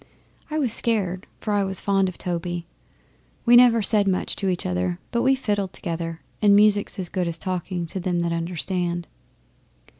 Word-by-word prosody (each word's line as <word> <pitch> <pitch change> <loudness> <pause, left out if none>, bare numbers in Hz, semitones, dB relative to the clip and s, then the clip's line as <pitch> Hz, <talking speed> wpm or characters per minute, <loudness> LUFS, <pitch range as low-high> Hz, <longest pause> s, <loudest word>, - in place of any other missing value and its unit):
I 310 - -2
was 260 -7 +3
scared, 195 -6 -1
for 210 - -2
I 205 -1 +2
was 190 -1 0
fond 195 -1 +1
of 180 - -10
Toby. 175 -1 -3 0.8
We 240 0 +6
never 240 -2 +6
said 205 -1 +3
much 185 -1 0
to 195 - 0
each 180 -1 -1
other, 90 -1 -1
but 235 - +1
we 270 +1 +4
fiddled 205 -7 -2
together, 165 -1 -5 0.2
and 205 -1 +6
music's 205 0 +3
as 185 -2 -3
good 180 0 -2
as 170 -1 -3
talking 180 -1 -3
to 180 +4 -3
them 175 -1 -1
that 170 0 -1
understand. 175 +1 -2
185 Hz, 180 wpm, -24 LUFS, 175-205 Hz, 0.8 s, We